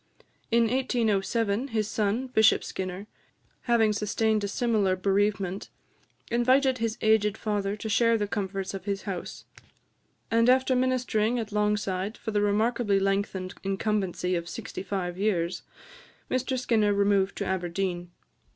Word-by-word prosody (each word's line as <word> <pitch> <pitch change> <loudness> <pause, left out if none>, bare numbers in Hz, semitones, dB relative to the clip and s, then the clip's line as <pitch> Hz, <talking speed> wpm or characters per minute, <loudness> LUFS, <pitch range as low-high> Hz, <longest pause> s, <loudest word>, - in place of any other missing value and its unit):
In 235 0 +4
1807, 230 -2 0
his 220 -5 -1
son, 215 +4 0
Bishop 220 -4 +4
Skinner, 185 +1 -5 0.6
having 225 -3 +3
sustained 215 +1 0
a - - 0
similar 205 -3 +1
bereavement, 195 0 0 0.6
invited 255 +2 +3
his 230 0 -1
aged 220 -1 +3
father 205 -2 -1
to 215 - -6
share 230 +1 +3
the 205 -1 -1
comforts 195 -2 -3
of 195 -1 -7
his 200 -1 -2
house; 190 -4 -6 0.9
and 230 +1 +4
after 260 0 +4
ministering 250 -3 +1
at 225 -2 -4
Longside 210 -1 -1
for 225 - -5
the 205 -1 +1
remarkably 205 0 +1
lengthened 195 -1 -1
incumbency 195 -2 -1
of 170 -1 -2
sixty - - -6
five 185 -2 -4
years, 180 -4 0 0.7
Mr 255 +1 0
Skinner 215 -5 +2
removed 200 -1 +2
to 200 - -2
Aberdeen. 180 -1 -2
210 Hz, 135 wpm, -27 LUFS, 195-230 Hz, 0.9 s, In